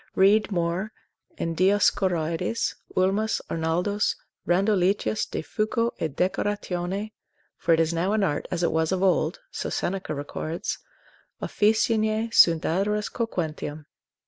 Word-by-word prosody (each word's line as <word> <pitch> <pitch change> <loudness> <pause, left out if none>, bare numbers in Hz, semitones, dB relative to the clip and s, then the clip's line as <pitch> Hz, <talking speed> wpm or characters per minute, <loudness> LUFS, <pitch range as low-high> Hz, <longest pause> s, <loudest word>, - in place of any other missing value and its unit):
Read 205 +3 +4
more 175 +3 -1 0.5
in 165 - -2
Dioscorides, 185 0 +1 0.2
Ulmus, 195 +4 +2
Arnoldus, 175 +6 0 0.3
Randoletius 195 +3 +2
de - - -3
fuco 230 +2 0
et 155 -4 -3
decoratione; 190 +1 -1 0.4
for 165 -2 +3
it - - -2
is 165 0 +2
now 175 +4 0
an 215 -2 +2
art, 150 -6 -1
as 175 -1 -2
it - - +2
was 160 +1 +1
of 190 0 0
old, 190 - +2
(so - - -4
Seneca 185 -4 -2
records) 155 +3 -4 0.6
officinae, 220 +1 +1
sunt 165 -2 +6
adores 205 +5 0
coquentium. 155 -9 -3
185 Hz, 120 wpm, -25 LUFS, 165-210 Hz, 0.6 s, sunt